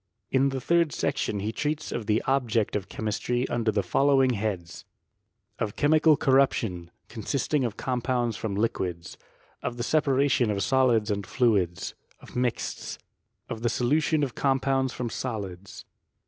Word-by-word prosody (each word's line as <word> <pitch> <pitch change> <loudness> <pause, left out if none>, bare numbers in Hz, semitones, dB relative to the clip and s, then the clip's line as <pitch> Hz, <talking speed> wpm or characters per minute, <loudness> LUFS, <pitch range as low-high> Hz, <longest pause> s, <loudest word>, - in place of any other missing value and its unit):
la 135 +1 +4
the 135 -1 -2
third 170 +3 +2
section 105 -6 -1
he 105 +2 -2
treats 150 +5 -2
of 115 -3 -4
the 110 0 +2
object 120 -5 +1
of 100 -2 -3
chemistry 120 +3 -1
under 115 -2 +1
the 100 -2 0
following 135 +6 +3
heads: 100 -6 -3 0.8
Of 105 - -2
chemical 155 +1 +4
corruption, 115 -10 +2 0.2
consisting 135 +5 -1
of 115 -3 -3
compounds 125 -2 -1
from 100 -1 -3
liquids, 90 -6 -2 0.5
of 120 - -4
the 120 - -2
separation 140 -3 +2
of 100 -2 0
solids 115 -1 +3
and 100 0 -1
fluids, 100 -9 +1 0.3
of - - -14
mixts, 125 -1 -2 0.5
of 115 -1 -6
the 120 - +1
solution 145 +6 +1
of 130 -4 -2
compounds 135 -1 +1
from 120 -2 -4
solids. 100 -7 -5
120 Hz, 145 wpm, -27 LUFS, 105-135 Hz, 0.8 s, la